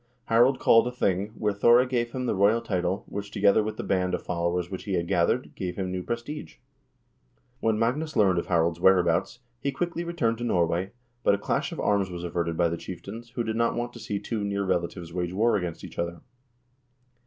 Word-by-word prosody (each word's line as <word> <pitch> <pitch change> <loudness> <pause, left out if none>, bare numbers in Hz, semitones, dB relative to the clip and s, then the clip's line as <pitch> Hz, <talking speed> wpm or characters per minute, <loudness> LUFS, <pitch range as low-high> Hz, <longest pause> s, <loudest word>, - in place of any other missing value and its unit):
Harald 120 +4 +5
called 115 +1 +5
a - - -2
thing, 100 -5 0
where 105 -1 0
Thore 120 +5 +5
gave 120 -2 -1
him 130 0 -3
the - - +1
royal 100 +3 +4
title, 90 0 -1
which, 100 0 -5
together 100 +1 +4
with 110 0 -4
the - - -4
band 90 -1 +1
of - - -7
followers 85 +1 -1
which 95 - -6
he 100 -3 -1
had 85 -1 -1
gathered, 95 +7 +1
gave 90 -2 -4
him 95 -2 -3
new 90 0 -2
prestige. 115 - -5 1.0
When 110 -3 +1
Magnus 140 +8 -1
learned 95 -4 +4
of - - -5
Harald 85 -1 +2
's - - -17
whereabouts, 90 +4 +3 0.2
he 140 +2 -1
quickly 170 +4 -2
returned 120 -10 -1
to - - -4
Norway, 90 -3 0 0.3
but - - +4
a - - -4
clash 100 - -1
of - - -6
arms 100 -2 +1
was 90 -1 -6
averted 85 -1 -2
by 85 - +3
the 85 - -3
chieftains, 110 +8 -8
who 120 - 0
did 110 -1 -2
not 115 0 +1
want 120 0 -3
to 120 - -10
see 105 -3 -3
two 105 +1 -3
near 100 0 -1
relatives 85 -2 -2
wage 90 0 -2
war 110 +4 +3
against 90 -4 -3
each - - -9
other. 85 0 -3
100 Hz, 215 wpm, -27 LUFS, 90-115 Hz, 1.0 s, Harald